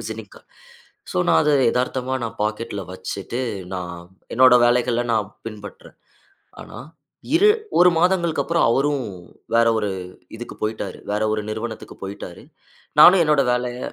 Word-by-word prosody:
Visiting 110 -2 -8
card - - -19 0.6
so, - - -1
நான் 80 - +5
அத - - +2 0.2
எதார்த்தமா 130 +1 -2
நான் 115 0 -7
பாக்கெட்ல 105 -1 -3
வச்சிட்டு 100 +6 -5 0.3
நான் 90 -1 -5 0.4
என்னோட 130 +1 +6
வேலைகள 120 0 +2
நான் 105 -2 0 0.2
பின்பற்றறேன். 105 -2 -10 0.7
ஆனா, - - -11 0.6
இரு 410 +5 +5 0.3
1 180 +1 +7
மாதங்களுக்கப்புறம் 170 -2 +1
அவரும் 140 +2 +1 0.5
வேற 115 0 +4
ஒரு 105 -2 -1 0.5
இதுக்கு 120 - -8
போய்ட்டாரு. 105 -3 -4
வேற 105 +1 -1
ஒரு 110 - -1
நிறுவனத்துக்கு 110 +1 -6
போய்ட்டாரு. 95 -3 -8 0.6
நானும் 180 -1 +8
என்னோட 150 -3 +3
வேலைய 125 0 -2
115 Hz, 130 wpm, -21 LUFS, 105-130 Hz, 0.7 s, நானும்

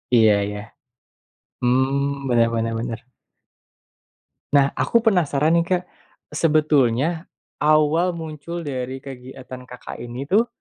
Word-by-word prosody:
Iya 110 -2 +6
iya. 105 0 -5 1.0
Mhm, 135 +2 +1
Bener 115 -1 +4
bener 115 0 -1
bener. 115 -1 -4 1.6
Nah, 140 0 +4
aku 235 -1 +2
penasaran 160 -2 +2
nih, 170 - 0
Kak, 180 -1 0 0.5
sebetulnya 155 0 +2 0.3
awal 155 +4 +3
muncul 165 +1 -6
dari 130 -1 -5
kegiatan 130 -1 -10
Kakak 125 - -9
ini 120 +3 -6
tuh 210 +10 +2
140 Hz, 105 wpm, -22 LUFS, 125-160 Hz, 1.6 s, Iya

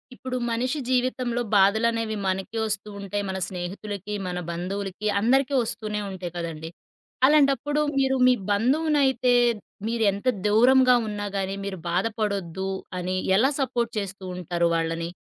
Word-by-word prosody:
ఇప్పుడు 255 0 -4
మనిషి 250 +6 -1
జీవితంలో 250 -1 0
బాధలనేవి 220 +3 +3
మనకి 190 +4 -2
వస్తూ 210 0 -3
ఉంటాయి, 200 +1 -3
మన 190 - -3
స్నేహితులకి, 195 +3 -5
మన 180 0 -3
బంధువులకి 195 +3 -4
అందరికీ 265 +6 +2
వస్తూనే 215 -2 -3
ఉంటాయి 185 -2 -6
కదండీ! 165 -2 -5 0.6
అలాంటప్పుడు 290 0 +3 0.2
మీరు 265 0 +2
మీ 255 - +6 0.2
బంధువునైతే 265 +3 +2 0.5
మీరెంత 220 -2 0 0.2
దూరంగా 250 +4 +5
ఉన్నా 205 -1 -4
గాని 195 0 -2
మీరు 195 -1 -4
బాధపడొద్దు 195 -1 -1 0.3
అని 180 +1 -2 0.2
ఎలా 260 +6 +4
సపోర్ట్ 240 -3 -1
చేస్తూ 195 -1 -6
ఉంటారు 170 -1 0
వాళ్ళని? 165 0 -1
210 Hz, 120 wpm, -25 LUFS, 190-250 Hz, 0.6 s, మీ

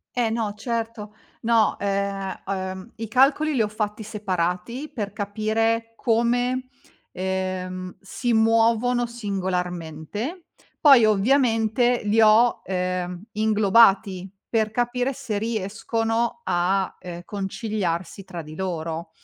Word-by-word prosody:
Eh, 240 -2 +1
no 220 -2 -1
certo 225 -2 -4 0.3
no, 230 -1 +3
ehm, 200 -1 -2
ehm, 190 +2 -4
i 225 0 -4
calcoli 275 +5 +3
li 225 - +3
ho - - 0
fatti 210 0 -3
separati, 200 - -3
per 205 -4 -3
capire 225 +2 -1
come, 245 +2 +1 0.4
ehm, 185 -1 -3
si 240 +5 -3
muovono 230 +2 +3
singolarmente. 190 - -4 0.3
Poi 275 -6 +7
ovviamente, 235 +2 +3
li 220 +2 +3
ho, 220 +3 +5
ehm, 180 0 -2
inglobati 205 -3 +3 0.2
per 220 -2 +1
capire 245 +2 0
se 215 -4 -4
riescono 225 +4 -1
a, 185 +2 0
ehm, 175 -1 -7
conciliarsi 195 -2 -3
tra 175 -3 -7
di 155 +1 -10
loro. 165 -3 -4
215 Hz, 110 wpm, -24 LUFS, 190-230 Hz, 0.4 s, Poi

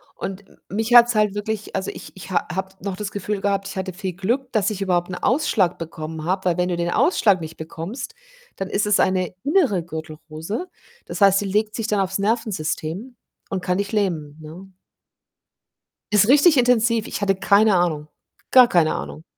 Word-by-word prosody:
Und 195 +1 -6 0.2
mich 225 +4 -1
hat's 240 0 +8
halt 210 -2 +2
wirklich 210 0 -4
also, 190 -1 -2
ich - - -11
ich 190 - -10
ha - - 0
habe 190 0 -3
noch 195 -1 -4
das 205 +1 -5
Gefühl 205 0 -3
gehabt, 195 -1 0
ich - - -7
hatte 190 0 -3
viel 185 0 -5
Glück, 235 +9 -2
dass 215 -3 +2
ich 205 -2 -5
überhaupt 180 -2 0
'n - - -3
Ausschlag 220 - +1
bekommen 160 -1 -7
habe, 185 +3 -1
weil 175 -2 +1
wenn 180 0 0
du 175 - -1
den 170 0 -1
Ausschlag 205 - +3
nicht 160 0 -8
bekommst, 185 - -7 0.4
dann 195 0 -5
ist 200 - 0
es 210 0 +3
eine 185 -1 0
innere 280 - +2
Gürtelrose. 160 - -6 0.4
Das - - -6
heißt, 195 -1 +5
die - - -3
legt 210 +2 0
sich 225 -2 -3
dann 210 -2 +1
aufs 195 0 -1
Nervensystem 205 0 -2 0.3
und 190 -2 -3
kann 180 0 -1
dich 200 0 -2
lähmen, 165 -9 -1
ne? 175 +5 -11 1.4
Ist 210 0 +5
richtig 290 +3 +6
intensiv, 230 -2 +3
ich - - -5
hatte 195 -1 +2
keine 200 +2 +4
Ahnung, 160 -4 0 0.4
gar 255 -2 +7
keine 170 -7 +2
Ahnung. 70 +1 -7
195 Hz, 190 wpm, -22 LUFS, 175-215 Hz, 1.4 s, hat's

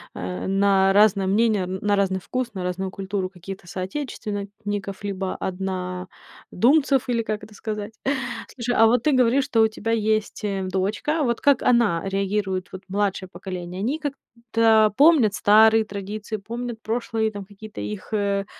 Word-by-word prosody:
э, 90 - -4
на 195 0 +3
разное 200 -2 +4
мнение, 210 -1 +2
на 200 +2 -1
разный 190 -2 +1
вкус, 255 +2 -3
на 185 -3 -4
разную 185 +1 -2
культуру 195 -1 -3
какие-то 185 0 -10
соотечественников, 205 -1 -5
либо 195 -2 -3
однодумцев, 190 - -1
или 235 -1 +1
как 215 -1 -4
это 210 0 -12
сказать. 210 0 -5 0.6
Слушай, 245 -1 -2
а 225 - +7
вот 235 +1 +2
ты 305 - +3
говоришь, 255 0 +3
что 250 -5 +2
у 220 - +6
тебя 225 +1 -4
есть, 215 -1 0
э, 195 -2 -1
дочка. 210 - 0
Вот 235 -3 0
как 285 -3 +4
она 235 -9 +3
реагирует, 195 -1 -1
вот 190 - -9
младшее 195 -1 -1
поколение? 180 -1 -7
Они 265 +9 -1
как-то 230 -6 +1
помнят 280 -8 +5
старые 220 +2 +5
традиции, 205 +1 -5
помнят 235 +2 -6
прошлые 225 -1 -1
там 205 -1 -7
какие-то 210 +2 -10
их, 210 +1 -6
э, 200 -1 0
205 Hz, 150 wpm, -23 LUFS, 195-230 Hz, 0.6 s, а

